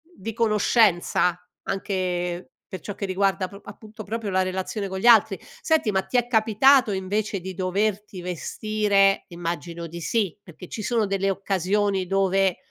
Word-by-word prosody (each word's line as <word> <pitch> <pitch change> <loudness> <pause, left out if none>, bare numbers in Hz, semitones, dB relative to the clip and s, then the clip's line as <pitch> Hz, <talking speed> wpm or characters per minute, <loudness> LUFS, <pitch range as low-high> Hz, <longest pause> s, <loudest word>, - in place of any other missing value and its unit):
di 225 +4 -6
conoscenza 210 -5 +2 0.2
anche 180 -2 -3 0.2
per 185 - -5
ciò 205 - -6
che 200 - -4
riguarda 190 0 0
pr 200 +2 -13
appunto, 215 +2 -10
proprio 215 -1 -4
la 190 - +2
relazione 190 +2 -3
con 190 - -5
gli 195 - -4
altri. 220 -5 +6 0.2
Senti, 315 -9 +2
ma 190 -1 +1
ti 250 - -1
è 240 - +1
capitato 235 +2 +4
invece 200 +2 -2
di 185 +1 -7
doverti 195 +1 -2
vestire 195 +2 +1
immagino 170 0 -5
di 170 +1 -8
sì, 200 -3 0
perché 175 -1 -12
ci 215 - -6
sono 225 0 +1
delle 195 0 0
occasioni 195 0 0
dove 195 -1 +2
195 Hz, 155 wpm, -24 LUFS, 185-215 Hz, 0.2 s, altri